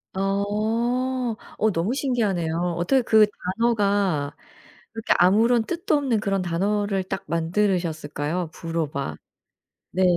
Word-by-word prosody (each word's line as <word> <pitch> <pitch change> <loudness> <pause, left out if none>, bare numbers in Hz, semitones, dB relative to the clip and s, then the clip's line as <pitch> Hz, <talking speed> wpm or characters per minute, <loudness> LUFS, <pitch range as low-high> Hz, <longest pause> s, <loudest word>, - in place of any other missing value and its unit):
어. 225 +5 0 0.2
어 220 0 +2
너무 175 +9 0
신기하네요. 180 - 0
어떻게 250 +10 +2
그 220 -2 +5 0.3
단어가 200 -10 +1 0.6
그렇게 225 -1 +1
아무런 220 +6 +4
뜻도 340 +2 -1
없는 260 -7 +1
그런 195 -2 0
단어를 195 +3 0
딱 190 - -5
만들으셨을까요? 165 -2 -1
부로바. 160 -4 -3 0.8
네. 185 - 0
200 Hz, 255 characters per minute, -24 LUFS, 170-225 Hz, 0.8 s, 그